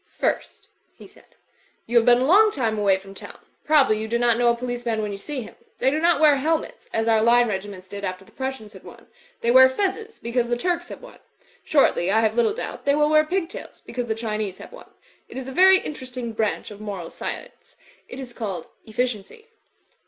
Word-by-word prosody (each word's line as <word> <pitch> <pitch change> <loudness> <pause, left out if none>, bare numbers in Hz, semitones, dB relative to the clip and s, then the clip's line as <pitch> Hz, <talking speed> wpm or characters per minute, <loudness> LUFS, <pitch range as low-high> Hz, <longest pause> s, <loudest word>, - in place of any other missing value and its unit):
'Tirst," - - -2 0.3
he - - -14
said, - - -20 0.5
"y^ti 235 - -7
have 235 -1 +5
been 240 0 +7
a 255 - +1
long 415 +8 +6
time 230 - -1
away 200 -2 +3
from 195 0 -13
town. - - -11 0.3
Probably 275 -8 +4
you 220 - -4
do 235 +2 0
not 235 -1 +3
know 240 +1 +3
a 235 - -2
policemsb 240 -2 -3
when 210 -1 -2
you 200 - -6
see 270 +6 -5
him. 220 - -10 0.2
They 265 - +2
do 300 - 0
not 335 -2 +3
wear 300 -2 +5
helmets, 320 - -2
as 225 0 -1
our 220 -1 +4
line 240 +2 +4
regiments 195 -2 -5
did 200 +1 -8
after 185 0 -5
the - - -21
Prussians 265 -5 -6
had 190 - -13
won. - - -14 0.4
They 235 - +2
wear 260 +1 +9
f 260 0 0
ezzes, 435 +3 -2
because 235 0 -1
the 240 - 0
Turks 350 +4 -2
have - - -10
won. - - -13 0.4
Shortly, 270 - +2
I 220 +3 +3
have 220 -1 +2
little 235 - +2
doubt, - - -6
they 280 0 +3
will 300 0 +3
wear 310 0 +5
pigtails, 360 +2 -4
because 245 0 -5
the 220 - -1
Chinese 215 -4 -3
have - - -12
won. - - -13 0.4
It - - -9
is 265 -1 -6
a - - -5
very 380 +6 +6
interesting 255 -8 -6
branch 220 -1 -2
of 205 0 -11
moral 195 -5 -6
science. - - -8 0.3
It 250 - -8
is 255 -2 -8
called 195 -9 -5 0.2
Efficiency. 245 - -4
240 Hz, 220 wpm, -23 LUFS, 215-290 Hz, 0.5 s, wear